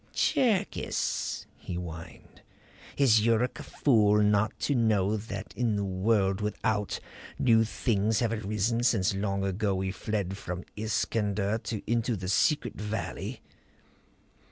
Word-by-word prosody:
"Cherkis," 230 -9 0
he 90 - -6
whined. 85 -1 -8 0.6
"Is 115 -6 +5
Yuruk 115 +2 +1
a - - -6
fool 105 -6 +3
not 105 +1 +2
to 145 - +1
know 110 -4 +2
that 100 -2 -6
in 115 -1 +1
the 100 - -1
world 95 +1 +1
without, 105 0 -1 0.4
new 115 -3 +4
things 110 -1 0
have 115 -2 +1
arisen 110 +2 -1
since 110 -6 +2
long 100 0 -1
ago 100 +1 0
we 95 0 -1
fled 100 -1 -3
from 90 -2 -5
Iskander 105 -1 -1 0.2
into 115 +1 0
the 90 -2 -5
secret 120 +3 +2
valley? 105 +1 -4
105 Hz, 125 wpm, -29 LUFS, 100-115 Hz, 0.6 s, Is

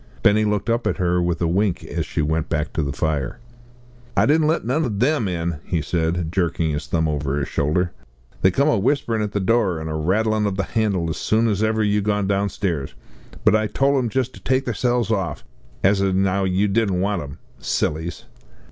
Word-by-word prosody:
Benny 110 -1 +4
looked 105 +1 -1
up 115 -1 +1
at 95 - 0
her 90 -1 +1
with 85 -1 0
a - - +2
wink 95 +2 0
as - - -4
she 75 - -1
went 80 +1 -1
back 75 -2 -1
to - - 0
the 70 -1 -2
fire. 70 - -2 0.8
"I - - +5
didn't 155 +1 +3
let 160 -5 +1
none 135 +7 +1
o' 130 - -1
them 120 +3 +1
in," 85 -3 -2
he 85 - -1
said, 85 0 -1
jerking 85 -3 0
his 75 -1 -4
thumb 80 -1 +1
over 75 -2 -1
his 70 - -1
shoulder. 85 +5 0 0.5
"They 95 - +5
come 140 +10 +2
a 150 - +3
whisperin' 115 -1 +1
at 105 -1 -3
the 105 - 0
door, 100 -4 +1
an' 80 0 -5
a 80 - -3
rattlin' 105 +6 +1
ov 100 - -2
the 100 - +1
handle 100 -4 0
as - - -4
soon 110 +2 +2
as 105 -2 0
ever 110 0 +1
you 105 0 +2
gone 105 0 0
downstairs. 95 -7 -1 0.5
But - - +6
I 110 0 +2
tole 140 +6 +1
'em 120 -2 -1
just 130 +2 -1
to - - -12
take 130 +1 0
theirselves 120 0 0
off, 95 -5 -2 0.4
an' 95 - +6
as 100 -1 0
'ow 95 0 +1
you 95 +2 +2
didn't 100 -3 +1
want 100 -1 0
'em. 70 0 -8 0.2
Sillies!" 80 +3 -2
100 Hz, 215 wpm, -22 LUFS, 85-110 Hz, 0.8 s, But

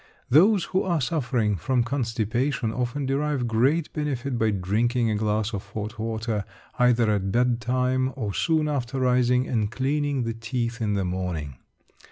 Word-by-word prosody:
Those 185 - +6
who 190 +2 0
are 170 -3 0
suffering 125 -7 0
from 120 +9 +1
constipation 120 0 -1
often 125 +3 -2
derive 140 -1 0
great 135 +8 +1
benefit 140 -4 -2
by 110 - +3
drinking 110 +5 +1
a - - 0
glass 105 +1 0
of 100 - -3
hot 110 +1 -5
water 110 -1 -2 0.4
either 120 -3 +4
at 95 -2 0
bedtime 125 +2 +1
or 110 -7 -3
soon 160 - +1
after 135 -3 -2
rising 125 0 +2
and 110 -4 0
cleaning 140 +1 0
the 115 0 -2
teeth 115 +1 -3
in 105 -2 0
the 95 -2 0
morning. 90 -7 -3
120 Hz, 155 wpm, -25 LUFS, 110-135 Hz, 0.4 s, Those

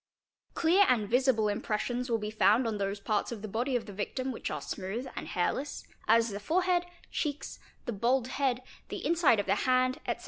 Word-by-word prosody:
Clear 350 +5 +5
and 220 -5 +2
visible 245 -2 +3
impressions 230 +4 -2
will 230 - +2
be 210 -1 -4
found 220 +3 +4
on 220 -2 -2
those 200 +1 -2
parts 210 +2 -1
of 220 -3 -6
the - - -3
body 240 +6 -1
of 240 - -1
the 205 - -9
victim 255 +6 -3
which 240 - -4
are - - -3
smooth 210 +7 -4
and - - -5
hairless, 265 +11 -2 0.2
as 230 +1 +5
the 200 -1 -5
forehead, 355 - +1 0.2
cheeks, 295 -2 -3 0.3
the 240 - -2
bald 245 +4 +1
head, 260 -2 0 0.3
the - - -5
inside 330 - +4
of 205 - 0
the - - +2
hand, 255 0 +2
etc. - - -1
240 Hz, 200 wpm, -30 LUFS, 210-265 Hz, 0.3 s, Clear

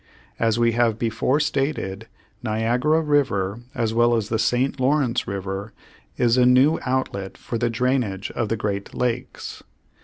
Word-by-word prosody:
As 115 -1 +2
we 120 0 +3
have 115 -1 +2
before 115 +5 +1
stated, 135 -9 -2 0.3
Niagara 120 +8 +1
River 120 -10 +1 0.2
as 110 -1 0
well 120 +1 +4
as 110 -2 -1
the 110 - 0
St. 125 +5 +1
Lawrence 130 -2 +1
River 100 +2 -4 0.4
is 120 0 +3
a - - +6
new 130 +5 +5
outlet 115 -7 -2
for 115 - -4
the 120 0 +1
drainage 115 -5 -1
of 110 -3 -2
the 115 - 0
great 100 -1 -3
lakes. 125 +1 -3
120 Hz, 150 wpm, -23 LUFS, 110-130 Hz, 0.4 s, a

